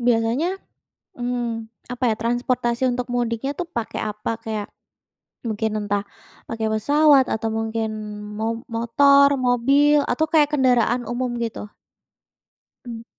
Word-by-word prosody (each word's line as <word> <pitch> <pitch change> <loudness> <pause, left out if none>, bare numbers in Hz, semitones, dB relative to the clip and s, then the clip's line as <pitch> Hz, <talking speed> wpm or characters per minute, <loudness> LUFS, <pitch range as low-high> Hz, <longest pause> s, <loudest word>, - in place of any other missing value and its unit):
biasanya, 235 +8 +2 0.7
mmm, 240 -2 -3 0.2
apa 250 +1 -5
ya, - - -5
transportasi 240 +1 0
untuk 245 0 -3
mudiknya 240 +2 -1
tuh, 355 - -2
pakai 235 -8 -4
apa? 210 +1 -3
Kayak, 215 -2 -4 0.8
mungkin 215 0 -1
entah 205 0 0 0.5
pakai 225 -1 -2
pesawat 275 +5 +4
atau 225 0 -1
mungkin 225 0 -2 0.5
mob 225 +2 -3
motor, 280 +5 +4
mobil, 275 +4 +3
atau 315 - 0
kayak 300 -3 +3
kendaraan 245 -3 +2
umum 245 +1 -2
gitu? 225 -2 -5 1.2
Mmm. 230 -1 -7
240 Hz, 120 wpm, -22 LUFS, 225-260 Hz, 1.2 s, pesawat